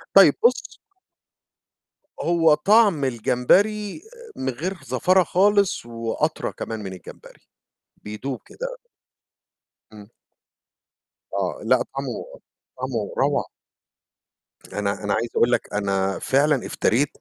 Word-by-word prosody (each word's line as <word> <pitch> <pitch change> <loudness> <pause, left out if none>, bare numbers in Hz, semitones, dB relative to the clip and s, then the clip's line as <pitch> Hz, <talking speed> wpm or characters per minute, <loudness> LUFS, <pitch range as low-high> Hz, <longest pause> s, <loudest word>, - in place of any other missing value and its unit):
طيب - - +8
بُص 475 - +1 1.4
هو 165 -2 +4
طعم 195 -2 +4
الجمبري 195 - +1 0.3
من 130 - -3
غير 170 +10 -4
زفارة 185 0 +3
خالص 200 - +2
وأطرى 115 -1 -2
كمان 110 -1 -6
من 95 - -6
الجمبري، 90 - -14 0.5
بيدوب 115 +5 -6
كده. - - -7 1.2
إمم. 105 -1 -13 1.3
آه. - - -2
لأ، - - +4 0.2
طعمه - - -6 0.4
طعمه 125 -5 -3
روعة. - - +1 1.3
أنا 100 0 -2
أنا 105 -1 0
عايز 115 +1 -1
أقول 120 +1 +3
لك - - -1
أنا 95 -1 -1
فعلًا 140 -1 +2
افتريت 135 +6 +1
130 Hz, 100 wpm, -23 LUFS, -, 1.4 s, طيب